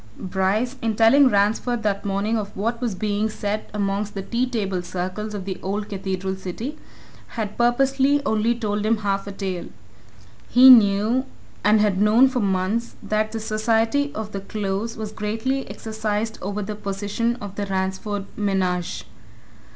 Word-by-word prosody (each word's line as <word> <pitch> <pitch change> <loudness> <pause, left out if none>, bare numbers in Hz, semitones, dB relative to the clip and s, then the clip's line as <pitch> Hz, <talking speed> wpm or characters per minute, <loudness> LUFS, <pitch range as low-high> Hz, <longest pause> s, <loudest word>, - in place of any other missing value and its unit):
Bryce, 195 +7 -1
in 225 -1 0
telling 245 +6 +6
Ransford 220 +3 +1
that 200 -1 -1
morning 200 +3 0
of 210 -2 -4
what 230 +4 -1
was 235 -6 -1
being 210 +2 0
said 210 0 -3
amongst 200 0 -2
the 195 - -3
tea 240 +5 0
table 195 -6 -1
circles 185 +4 -4
of 195 -2 -5
the 190 -2 -4
old 205 +2 -3
cathedral 190 -1 -3
city, 190 - -5 0.6
had 210 -2 -3
purposely 270 +4 +3
only 220 0 +2
told 210 -3 -2
him 220 +1 +2
half 200 -1 -1
a - - -4
tale. 190 -3 -4 0.8
He 255 +2 +9
knew, 220 +2 +5 0.4
and 210 +1 +5
had 205 -2 +2
known 225 +5 +6
for 255 -1 -1
months, 200 +3 0
that 215 0 0
the 225 - -3
society 225 +6 +1
of 215 -1 -5
the 195 - -4
Close 205 +2 -3
was 215 -1 -5
greatly 225 +6 -2
exercised 220 0 -3
over 205 +2 -3
the 210 +2 -4
position 205 +3 -2
of 205 -5 -8
the 200 0 -3
Ransford 190 +1 -2
menage. 185 -4 -1
210 Hz, 160 wpm, -23 LUFS, 195-225 Hz, 0.8 s, He